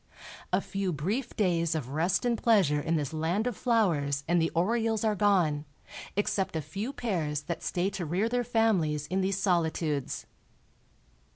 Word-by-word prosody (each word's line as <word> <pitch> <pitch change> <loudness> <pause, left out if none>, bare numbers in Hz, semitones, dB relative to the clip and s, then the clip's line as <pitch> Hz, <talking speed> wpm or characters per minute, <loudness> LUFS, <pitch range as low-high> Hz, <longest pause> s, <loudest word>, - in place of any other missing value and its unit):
A - - +2
few 195 -2 -2
brief 195 - -2
days 170 -5 +1
of 140 -5 -3
rest 170 - +1
and 240 -1 +2
pleasure 195 - +3
in 165 +2 0
this 150 -2 -2
land 165 +7 0
of 245 -3 -1
flowers 160 - +1
and 175 0 +3
the 165 - +2
orioles 225 +5 +1
are 220 -1 +2
gone, 180 -8 +2 0.5
except 195 -3 0
a 160 - 0
few 210 - -4
pairs 165 - -2
that 170 +2 -4
stay 185 +2 -1
to 185 -3 -4
rear 185 +8 +1
their 245 +1 0
families 200 -11 +1
in 190 +1 +1
these 190 0 0
solitudes. 160 -6 0
180 Hz, 165 wpm, -29 LUFS, 160-215 Hz, 0.5 s, pleasure